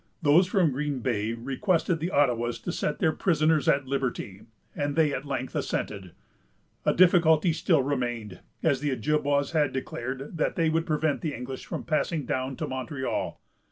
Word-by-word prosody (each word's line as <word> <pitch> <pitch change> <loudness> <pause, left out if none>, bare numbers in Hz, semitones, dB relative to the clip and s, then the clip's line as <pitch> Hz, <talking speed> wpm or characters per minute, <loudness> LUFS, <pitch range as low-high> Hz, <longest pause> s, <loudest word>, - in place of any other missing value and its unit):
Those 160 +5 +5
from 185 -6 +2
Green 140 0 -2
Bay 115 -3 -1
requested 160 - 0
the 165 +3 -2
Ottawas 120 -6 +1
to - - -2
set 150 - -2
their 160 - +2
prisoners 155 -3 +2
at 140 0 +2
liberty, 130 -8 -3 0.3
and 145 -1 -2
they 155 -3 +3
at 135 - -4
length 135 -2 -3
assented. 95 -4 -3 0.7
A - - +4
difficulty 170 -2 +5
still 160 -3 +2
remained, 120 -8 -3 0.2
as 145 -5 +2
the 145 +1 -1
Ojibwas 140 +2 0
had 155 -4 +2
declared 130 +3 -5
that - - 0
they 165 -1 +2
would 165 +1 0
prevent 155 -2 0
the 155 -4 -2
English 125 +2 -7
from - - -4
passing 155 -1 -1
down 130 +2 -2
to - - -4
Montreal. 130 +1 -3
145 Hz, 165 wpm, -27 LUFS, 130-160 Hz, 0.7 s, Those